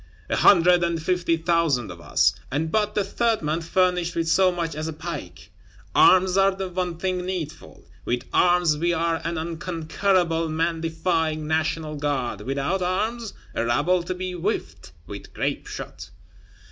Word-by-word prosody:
A - - +2
hundred 180 -1 +5
and 170 -1 0
fifty 170 0 0
thousand 160 - +1
of 85 -1 -11
us, - - +2 0.2
and 160 +4 -1
but 210 +1 0
the 205 - +2
third 225 +1 0
man 155 +3 -1
furnished 180 0 +1
with 165 -1 -1
so 185 +3 +4
much 170 -2 -3
as 155 +1 -4
a 160 - -4
pike! 150 - -8 0.4
Arms 185 0 +5
are 195 0 +5
the 190 -1 -4
one 180 -1 -3
thing 185 0 -2
needful: 180 -4 -6 0.2
with 120 0 -2
arms 175 -4 +3
we 175 +1 +1
are 165 0 0
an 165 0 -2
unconquerable 165 +1 0
man 165 +1 -1
defying 160 -1 -1
National 155 0 -1
Guard; 135 -7 -2
without 140 - -1
arms, 215 +5 -2 0.2
a - - -1
rabble 145 +10 +2
to 180 +2 -4
be 185 0 -4
whiffed 175 - -4
with 100 -1 -10
grape - - -2
shot. - - -8
170 Hz, 160 wpm, -24 LUFS, 155-180 Hz, 0.4 s, hundred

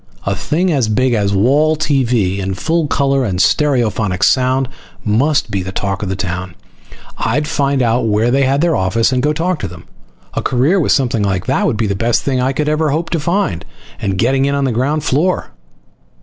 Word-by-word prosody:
A 100 - 0
thing 170 - 0
as 135 -7 +1
big 130 +3 +1
as 100 -3 +1
wall 140 +10 +2
TV 120 -10 0
in 95 0 -3
full 160 - 0
color 140 -2 +1
and 95 -6 -2
stereophonic 110 -6 +1
sound 130 0 +2 0.4
must 135 +8 +1
be 100 - -1
the 95 +1 -5
talk 95 0 -3
of 100 - -3
the 95 - -2
town. 90 -2 -4 0.6
I'd 145 +7 0
find 140 -3 0
out 115 0 +1
where 110 +3 +1
they 135 +2 +2
had 135 +2 +1
their 170 -2 +2
office 110 +5 +1
and 130 -1 +1
go 150 +3 +1
talk 165 +2 -1
with - - -3
them. 85 -2 -12 0.5
A - - -2
career 135 +10 +2
with 160 - +1
something 120 -5 +1
like 95 -3 -1
that 135 +4 +1
would 120 - -1
be 110 - 0
the 100 - 0
best 115 +4 0
thing 130 -2 0
I 130 +1 +1
could 150 +2 -2
ever 155 0 +1
hope 160 +4 -2
to 165 - 0
find. 150 - -1 0.4
And 95 -1 -1
getting 135 +6 +2
in 140 0 0
on 140 - 0
the 135 - +1
ground 140 +6 0
floor! 155 - 0
130 Hz, 210 wpm, -16 LUFS, 100-145 Hz, 0.6 s, wall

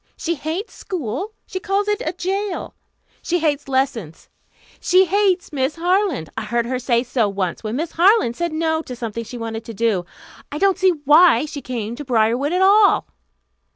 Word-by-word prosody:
She 340 - -1
hates 320 +7 -5
school. 365 - -5
She 375 - -5
calls 395 +2 -1
it 420 +2 0
a - - -1
jail. 385 +2 -3 0.5
She 350 - 0
hates 300 -4 -1
lessons. 255 - -2 0.5
She 370 +1 +4
hates 380 -3 +1
Miss 270 +1 -1
Harland. 350 - 0
I 220 - -4
heard 235 +2 0
her 255 +1 -2
say 240 -1 +1
so 240 -4 0
once, 195 -1 -3
when 215 +1 -3
Miss 320 +4 -3
Harland 365 - +3
said 345 +3 -2
no 320 0 0
to 255 -5 -8
something 230 -1 -5
she 245 +2 -9
wanted 225 -1 -5
to 230 -2 -8
do. 205 -5 0 0.4
I 295 - -4
don't 390 +2 +2
see 380 -1 +5 0.2
why 300 -2 +6
she 295 -2 -7
came 235 -3 -4
to 295 - -6
Briarwood 245 +3 +1
at 365 +2 +2
all." 400 +1 +4
295 Hz, 185 wpm, -20 LUFS, 235-365 Hz, 0.5 s, why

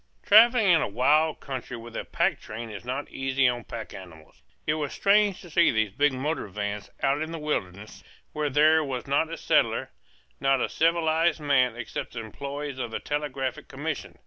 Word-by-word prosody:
Travelling 225 +2 +6
in 175 -4 +5
a - - 0
wild 150 +8 +2
country 130 -3 -6
with 115 0 -11
a - - -3
pack 170 -4 0
train 115 +1 -7
is 105 0 -8
not 130 +4 -4
easy 135 0 +1
on 120 -1 0
the 120 - -15
pack 115 -2 -7
animals. 85 -5 -13 0.2
It 150 - +1
was 150 -3 -3
strange 205 -1 +3
to 175 - -12
see 170 +1 +4
these 110 -3 +1
big 145 +7 +2
motor 135 +1 -3
vans 105 +1 -5
out 140 +2 +2
in 160 +1 -3
the 165 - -4
wilderness 105 - -4 0.3
where 150 -1 -1
there 155 +3 +4
was 130 -4 -4
not 140 +4 +1
a 165 - -4
settler, - - +1 0.5
not 135 -1 +2
a - - -1
civilized 165 0 +2
man 135 -5 +2
except 120 - -6
the 120 - -5
employees 140 +4 -6
of 120 -2 -3
the 115 - -4
Telegraphic 140 -3 -3
Commission. - - -5
140 Hz, 195 wpm, -26 LUFS, 120-155 Hz, 0.5 s, Travelling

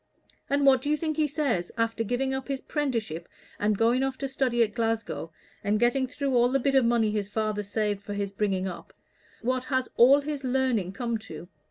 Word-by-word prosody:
And 280 0 +2
what 265 -2 +6
do 290 - -3
you 300 - +2
think 310 -1 -2
he 310 -1 +3
says, 270 - -1
after 230 0 0
giving 250 +4 -1
up 265 0 -4
his 275 -1 -2
'prenticeship, 230 - -2 0.3
and 205 0 +1
going 235 +4 +3
off 270 -1 -1
to 275 - -3
study 255 -3 +1
at 215 -2 -2
Glasgow, 225 -7 -2 0.3
and 210 +1 +1
getting 255 +3 +2
through 275 +1 -2
all 240 0 +4
the 275 - +2
bit 275 +2 +1
of 265 -1 +5
money 230 -2 +2
his 205 -2 -2
father 215 0 -1
saved 205 0 -1
for 205 0 -6
his 200 -1 -2
bringing 195 -2 -1
up 180 -2 -8 0.5
what 255 +1 0
has 260 -1 -1
all 270 +5 +7
his 290 -1 -4
learning 250 -7 0
come 235 +1 -2
to? 175 -5 -10
240 Hz, 210 wpm, -27 LUFS, 210-270 Hz, 0.5 s, all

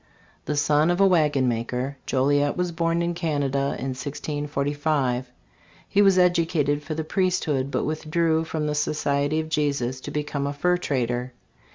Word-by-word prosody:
The - - -1
eon 150 +2 +4
of 175 +1 +1
a 195 - +6
wagonmaker, 135 -6 +1
Joliet 145 +2 +2
was 180 -1 0
born 165 +1 0
in 170 0 -1
Canada 145 -5 -1
in 135 - -3
1645. 145 -1 -2 0.6
He 200 - +3
was 195 -2 +5
educated 165 -5 +2
for 155 +1 -5
the 160 - -2
priesthood, 155 -6 0
but - - -1
withdrew 160 +1 0
from 160 -1 -3
the 150 - -1
Society 145 0 0
of 160 - -3
Jesus 140 -5 -1
to - - -6
be 150 - -2
come 145 -1 -3
a 140 - -2
fur 180 +5 +1
trader. 125 -5 -2
150 Hz, 160 wpm, -24 LUFS, 140-165 Hz, 0.6 s, a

